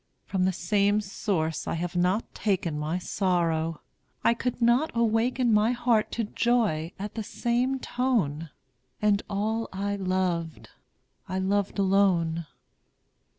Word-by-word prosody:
From 185 Hz, -2 st, 0 dB
the 190 Hz, -, +3 dB
same 200 Hz, +4 st, +2 dB
source 190 Hz, -6 st, -2 dB
I -, -, -1 dB
have 175 Hz, +1 st, -3 dB
not 180 Hz, +5 st, +1 dB
taken 180 Hz, -7 st, -1 dB
My 155 Hz, +3 st, -1 dB
sorrow; 165 Hz, -4 st, 0 dB, 0.4 s
I 230 Hz, -, +5 dB
could 245 Hz, +1 st, -3 dB
not 240 Hz, +6 st, +3 dB
awaken 235 Hz, +1 st, +2 dB
My 215 Hz, +3 st, +4 dB
heart 235 Hz, -3 st, +1 dB
to 235 Hz, -, -1 dB
joy 210 Hz, -8 st, +1 dB
at 205 Hz, +2 st, -5 dB
the 225 Hz, -, -3 dB
same 240 Hz, +5 st, 0 dB
tone; 215 Hz, -, -1 dB, 0.5 s
And 210 Hz, -1 st, +2 dB
all 220 Hz, +3 st, -1 dB
I 200 Hz, +1 st, -2 dB
loved, 185 Hz, -4 st, -2 dB, 0.6 s
I 185 Hz, -, -2 dB
loved 200 Hz, +2 st, 0 dB
alone. 185 Hz, -5 st, +2 dB
200 Hz, 130 wpm, -27 LUFS, 175-225 Hz, 0.6 s, I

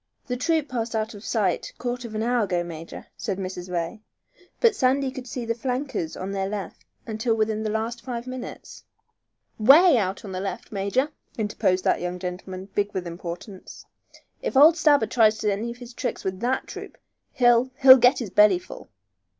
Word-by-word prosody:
"The 250 Hz, -, -3 dB
troop 315 Hz, +4 st, 0 dB
passed 235 Hz, -3 st, -3 dB
out 220 Hz, +1 st, -2 dB
of 205 Hz, 0 st, -11 dB
sight 200 Hz, -8 st, -1 dB
quarter 245 Hz, 0 st, -4 dB
of 220 Hz, -, -9 dB
an 215 Hz, -, -1 dB
hour 240 Hz, -2 st, +1 dB
ago, 175 Hz, -3 st, -1 dB
major," 165 Hz, -1 st, -9 dB
said 195 Hz, -3 st, -3 dB
Mrs. 185 Hz, -1 st, -6 dB
Ray. 175 Hz, +5 st, -3 dB, 0.6 s
"But 460 Hz, -3 st, +4 dB
Sandy 265 Hz, -1 st, +1 dB
could 260 Hz, -1 st, -8 dB
see 245 Hz, 0 st, -5 dB
the 230 Hz, -, 0 dB
flankers 250 Hz, -, -3 dB
on 190 Hz, +1 st, -5 dB
their 195 Hz, -1 st, -2 dB
left 205 Hz, -2 st, -6 dB, 0.2 s
until 225 Hz, +1 st, -1 dB
within 215 Hz, 0 st, 0 dB
the 215 Hz, -, -2 dB
last 225 Hz, +2 st, -3 dB
five 240 Hz, -2 st, -5 dB
minutes." 255 Hz, -1 st, -8 dB, 0.8 s
"Way 275 Hz, +5 st, +7 dB
out 195 Hz, +1 st, -3 dB
on 195 Hz, -, -7 dB
their 185 Hz, 0 st, -4 dB
left, 195 Hz, -, -5 dB
major!" 215 Hz, +8 st, 0 dB, 0.3 s
interposed 200 Hz, -4 st, 0 dB
that -, -, +1 dB
young 180 Hz, 0 st, -3 dB
gentleman, 185 Hz, +1 st, -6 dB
big 205 Hz, 0 st, 0 dB
with 185 Hz, -2 st, -2 dB
importance. 175 Hz, +3 st, -8 dB, 0.6 s
"If -, -, -2 dB
old 310 Hz, +4 st, +8 dB
Stabber 290 Hz, -7 st, +4 dB
tries 220 Hz, -2 st, +2 dB
any 210 Hz, +2 st, -1 dB
of 235 Hz, -, -7 dB
his 245 Hz, -1 st, -11 dB
tricks -, -, -4 dB
with 190 Hz, -1 st, -3 dB
that 250 Hz, +3 st, -1 dB
troop -, -, -9 dB, 0.4 s
he'll 240 Hz, -1 st, +4 dB
he'll 260 Hz, -1 st, +11 dB
get 250 Hz, +2 st, +5 dB
his 225 Hz, -7 st, -5 dB
belly 210 Hz, -3 st, +6 dB
full!" 175 Hz, -, -11 dB
220 Hz, 185 wpm, -24 LUFS, 190-250 Hz, 0.8 s, he'll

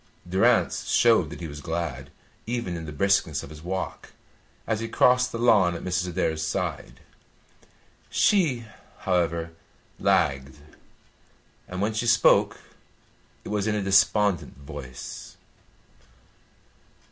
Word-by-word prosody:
Durrance 95 Hz, +2 st, +2 dB
showed 115 Hz, -9 st, +4 dB
that 80 Hz, -, -9 dB
he 85 Hz, -, -4 dB
was 75 Hz, -1 st, -9 dB
glad 80 Hz, -5 st, -4 dB, 0.4 s
even 115 Hz, -7 st, -3 dB
in 80 Hz, -1 st, -6 dB
the -, -, -6 dB
briskness 85 Hz, -2 st, +1 dB
of -, -, -10 dB
his 75 Hz, 0 st, -11 dB
walk, 95 Hz, +3 st, -5 dB, 0.5 s
as 110 Hz, -1 st, -1 dB
he 115 Hz, -, -3 dB
crossed 125 Hz, +1 st, +3 dB
the -, -, -4 dB
lawn 105 Hz, -7 st, +4 dB
at 85 Hz, -, -7 dB
Mrs. 90 Hz, 0 st, -1 dB
Adair's 80 Hz, -2 st, -1 dB
side. 80 Hz, -, -4 dB, 1.1 s
She, 150 Hz, -, +2 dB, 0.4 s
however, 85 Hz, -3 st, 0 dB, 0.5 s
lagged, 70 Hz, -1 st, +1 dB, 1.1 s
and 90 Hz, +2 st, -4 dB
when 110 Hz, +2 st, 0 dB
she 115 Hz, +2 st, -2 dB
spoke 120 Hz, 0 st, +4 dB, 0.9 s
it -, -, -8 dB
was 105 Hz, 0 st, -1 dB
in 110 Hz, -, +1 dB
a 105 Hz, -, -1 dB
despondent 95 Hz, -2 st, +2 dB
voice. 70 Hz, -3 st, -9 dB
90 Hz, 125 wpm, -25 LUFS, 80-110 Hz, 1.1 s, showed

